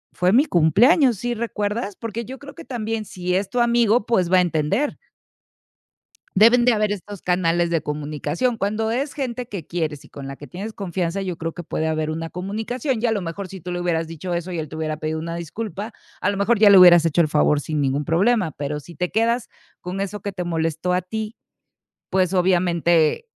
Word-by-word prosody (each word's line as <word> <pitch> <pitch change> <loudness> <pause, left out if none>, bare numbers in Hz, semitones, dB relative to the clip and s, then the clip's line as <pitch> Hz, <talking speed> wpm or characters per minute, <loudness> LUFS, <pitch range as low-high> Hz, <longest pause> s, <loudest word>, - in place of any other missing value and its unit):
fue 180 +1 +2
mi 265 +6 +5
cumpleaños, 230 - +4
¿sí, 240 +5 -2
recuerdas?". 210 -2 -3
Porque 230 0 -5
yo 260 +3 -8
creo 280 0 -11
que 330 - -10
también, 225 -3 -3
si 180 -1 -3
es 195 +1 0
tu 245 - 0
amigo, 235 -2 +3
pues 185 -7 +1
va 185 - +6
a - - +6
entender. 175 - 0 1.4
Debes 235 +4 +6
de 250 - +5
haber 215 -2 +1
estos 205 -1 -6
canales 175 -1 +1
de 165 -1 +1
comunicación. 150 - -2
Cuando 215 +2 -1
es 270 +5 -2
gente 250 -3 -4
que 195 -8 -6
quieres 155 -5 -3
y - - -15
con 140 -1 -9
la 135 - -6
que 145 +1 -12
tienes 200 - -6
confianza, 185 -1 -3
yo 185 -3 -3
creo 165 0 -3
que 175 - -7
puede 160 0 -2
haber 155 -1 -1
una 165 +1 -4
comunicación 220 - -3
y 240 - +1
a 225 - +1
lo 210 - 0
mejor 175 +3 -5
si 190 +1 -10
tú 180 - -7
le 175 0 -3
hubieras 165 -2 -1
dicho 165 +2 -5
eso 170 +1 -3
y 175 - -4
él 155 -1 -4
te - - -10
hubiera 155 -1 -2
pedido 155 +1 -3
una 165 +1 -4
disculpa, 205 +5 -5 0.3
a 195 - +1
lo 200 - -3
mejor 205 +3 +2
ya 210 -1 +7
le 200 - +9
hubieras 175 -2 +8
hecho 165 +1 +2
el 160 - +4
favor 150 -1 +3
sin 150 +2 -2
ningún 140 +1 0
problema. 185 +3 +2
Pero 145 +1 -4
si 170 +2 -13
te 180 +4 -2
quedas 230 +2 +1 0.3
con 180 +2 -5
eso 200 0 -4
que 200 -1 -4
te 185 -1 -4
molestó 165 0 -1
a 180 0 +1
ti, 220 +4 -5 0.7
pues 185 -1 +1
obviamente 175 - +2
185 Hz, 220 wpm, -22 LUFS, 165-220 Hz, 1.4 s, le